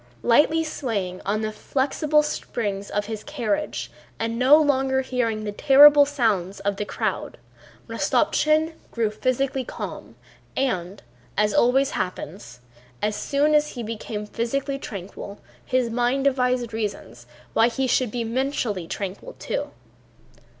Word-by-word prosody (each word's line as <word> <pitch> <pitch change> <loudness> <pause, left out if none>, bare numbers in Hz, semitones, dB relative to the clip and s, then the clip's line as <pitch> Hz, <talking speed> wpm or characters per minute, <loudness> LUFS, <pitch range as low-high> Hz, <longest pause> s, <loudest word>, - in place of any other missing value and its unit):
Lightly 300 +7 +4
swaying 205 - -3
on 210 +2 0
the 215 0 -2
flexible 290 +6 +1
springs 205 -8 -3
of 205 0 -1
his 215 0 -6
carriage 275 -1 -2 0.3
and 230 +1 -2
no 265 +4 +7
longer 265 -3 +2
hearing 235 -4 -1
the 210 - -3
terrible 285 +5 +7
sounds 215 -9 0
of 200 -1 -1
the 210 - -2
crowd, - - -3 0.5
Rostopchín 310 +1 +2 0.2
grew 225 -3 -1
physically 255 +4 -1
calm - - -7 0.4
and, 190 -7 -2 0.3
as 210 -1 +2
always 265 +3 +3
happens, 125 -9 -5 0.4
as 210 0 -1
soon 290 +5 +1
as 300 0 +3
he 240 - -5
became 215 -1 -5
physically 275 +6 -2
tranquil 200 -2 -8 0.2
his 255 -3 0
mind 245 +3 +1
devised 250 -3 +1
reasons 125 - -5 0.3
why 225 - +5
he 265 +2 -1
should 255 -1 +2
be 235 +2 -3
mentally 230 - -2
tranquil 200 - -5
too. - - -3
240 Hz, 130 wpm, -24 LUFS, 210-275 Hz, 0.5 s, no